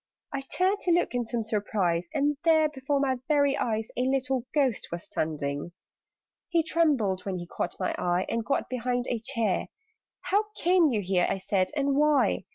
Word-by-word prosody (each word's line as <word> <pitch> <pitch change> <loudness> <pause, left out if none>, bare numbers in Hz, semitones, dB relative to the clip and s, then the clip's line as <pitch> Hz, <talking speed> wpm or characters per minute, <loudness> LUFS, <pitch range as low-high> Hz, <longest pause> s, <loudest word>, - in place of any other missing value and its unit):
I 275 - -2
turned 370 +8 0
to 355 - 0
look 345 -4 +2
in 245 -2 -1
some 235 -1 -2
surprise, 200 -5 0
And 295 -1 +1
there, 320 -2 +5
before 280 0 -1
my 265 -2 +1
very 285 -2 +3
eyes, 220 -1 -1
A - - -1
little 260 -1 0
Ghost 270 -7 +1
was 170 0 -4
standing! 150 +1 -3 0.8
He 335 -2 +2
trembled 275 - +1
when 190 -2 -3
he 175 - -6
caught - - -4
my 185 - 0
eye, 180 +1 +1
And 230 0 -1
got 275 - -1
behind 245 0 -1
a 240 - -1
chair. 230 -5 -1 0.5
"How 415 +2 +1
came 350 -2 +4
you 220 -5 0
here," 180 -2 +1
I - - 0
said, 185 -1 0
"and 280 -1 +1
why? 300 0 +3
250 Hz, 180 wpm, -27 LUFS, 195-290 Hz, 0.8 s, there